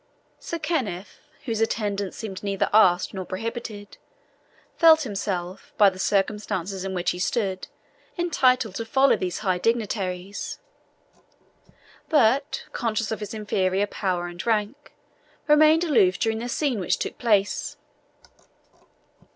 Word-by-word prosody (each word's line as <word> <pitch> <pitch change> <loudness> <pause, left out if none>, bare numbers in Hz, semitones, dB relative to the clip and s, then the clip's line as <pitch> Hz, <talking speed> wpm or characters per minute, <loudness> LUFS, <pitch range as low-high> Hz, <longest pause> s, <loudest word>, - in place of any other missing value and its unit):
Sir 335 - -5
Kenneth, 255 - -3 0.3
whose 225 -3 -2
attendance 205 -4 -1
seemed 195 -4 -6
neither 200 -1 -1
asked 185 -5 +4
nor 190 -1 -4
prohibited, 210 +1 -6 0.8
felt 320 -2 +6
himself, 195 -5 -4
by 205 -2 +6
the 185 - -12
circumstances 195 -2 -1
in 190 -1 -4
which 175 -1 0
he 180 - -6
stood, 190 -1 -1 0.5
entitled 255 - +2
to 230 - -4
follow 265 +4 +4
these 180 -1 -3
high 185 -2 +1
dignitaries; 200 -4 -2 1.5
but, 280 0 +2
conscious 225 -2 -2
of 220 - -2
his 210 +1 -6
inferior 200 -2 0
power 185 -3 -2
and 175 0 -7
rank, 225 +6 -1 0.6
remained 310 +2 +5
aloof 215 - +3
during 220 +2 0
the 240 +2 -5
scene 265 -3 0
which 180 - 0
took - - -5
place. 210 -4 +1
210 Hz, 125 wpm, -24 LUFS, 190-240 Hz, 1.5 s, felt